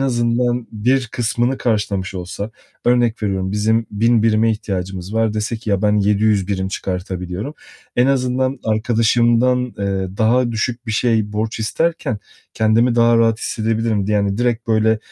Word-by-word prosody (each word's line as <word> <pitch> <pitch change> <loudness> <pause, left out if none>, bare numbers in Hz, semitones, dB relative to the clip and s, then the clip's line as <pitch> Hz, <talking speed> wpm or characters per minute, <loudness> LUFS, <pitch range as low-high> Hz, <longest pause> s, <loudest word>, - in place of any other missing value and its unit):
azından 120 -1 0
bir 125 +4 +1
kısmını 120 +2 0
karşılamış 100 -4 -1
olsa 95 +4 -5 0.4
Örnek 120 -2 +2
veriyorum: 95 -2 -1
Bizim 110 +2 +1
1.000 115 +2 +2
birime 110 0 +3
ihtiyacımız 95 -2 -4
var, 110 -1 +1
dese 110 +2 -2
ki 110 -2 -5
"Ya, 100 0 +1
ben 105 0 +3
700 105 -1 +2
birim 95 -1 -1
çıkartabiliyorum." 90 - -4 0.4
En 125 +2 +4
azından 130 0 0
arkadaşımdan, 120 +3 +2
eee, 95 -1 -2
daha 120 +2 +2
düşük 120 +2 -3
bir 110 - -2
şey, 110 -2 +1
borç 110 +2 -2
isterken 140 +1 -1 0.4
kendimi 115 +2 +3
daha 115 0 +4
rahat 115 -1 +3
hissedebilirim 110 -2 -1
di - - -2
yani, 100 0 +1
direkt 120 -1 0
böyle 110 0 +3
110 Hz, 145 wpm, -19 LUFS, 105-120 Hz, 0.4 s, En